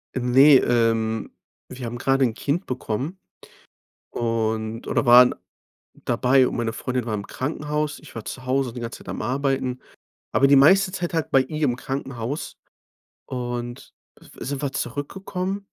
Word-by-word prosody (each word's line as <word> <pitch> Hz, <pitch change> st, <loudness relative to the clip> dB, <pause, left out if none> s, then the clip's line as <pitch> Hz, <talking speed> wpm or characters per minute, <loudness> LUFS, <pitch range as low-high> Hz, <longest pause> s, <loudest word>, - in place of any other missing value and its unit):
Äh, -, -, 0 dB
ne, 130 Hz, +3 st, +7 dB
ähm, 115 Hz, -2 st, +1 dB, 0.4 s
wir 125 Hz, -1 st, -7 dB
haben 120 Hz, +1 st, -5 dB
gerade 135 Hz, +2 st, +2 dB
'n 115 Hz, -, -1 dB
Kind 145 Hz, +9 st, -2 dB
bekommen 130 Hz, -, -4 dB, 0.9 s
und 110 Hz, -1 st, -2 dB
oder -, -, 0 dB
waren 125 Hz, +1 st, +8 dB, 0.7 s
dabei. 125 Hz, +2 st, +3 dB
Und -, -, -4 dB
meine 115 Hz, -1 st, -1 dB
Freundin 125 Hz, 0 st, -3 dB
war 110 Hz, -, -3 dB
im 100 Hz, -1 st, -4 dB
Krankenhaus, 150 Hz, +2 st, -3 dB
ich -, -, -15 dB
war 115 Hz, -, -6 dB
zu 130 Hz, -1 st, -7 dB
Hause 130 Hz, -2 st, 0 dB
die 125 Hz, -, -7 dB
ganze 115 Hz, 0 st, -6 dB
Zeit -, -, -12 dB
am -, -, -4 dB
Arbeiten, 130 Hz, +1 st, -1 dB, 0.5 s
aber 140 Hz, -, +4 dB
die 140 Hz, -, +6 dB
meiste 185 Hz, +8 st, +6 dB
Zeit 175 Hz, -2 st, -4 dB
halt 160 Hz, -3 st, -1 dB
bei 135 Hz, -, +5 dB
ihr 155 Hz, +4 st, -4 dB
im 125 Hz, -, +1 dB
Krankenhaus 135 Hz, 0 st, -5 dB, 0.7 s
und 120 Hz, -1 st, -5 dB, 0.5 s
sind 140 Hz, 0 st, -4 dB
wir 140 Hz, -, -2 dB
zurückgekommen 190 Hz, +7 st, -4 dB
130 Hz, 155 wpm, -23 LUFS, 120-145 Hz, 0.9 s, waren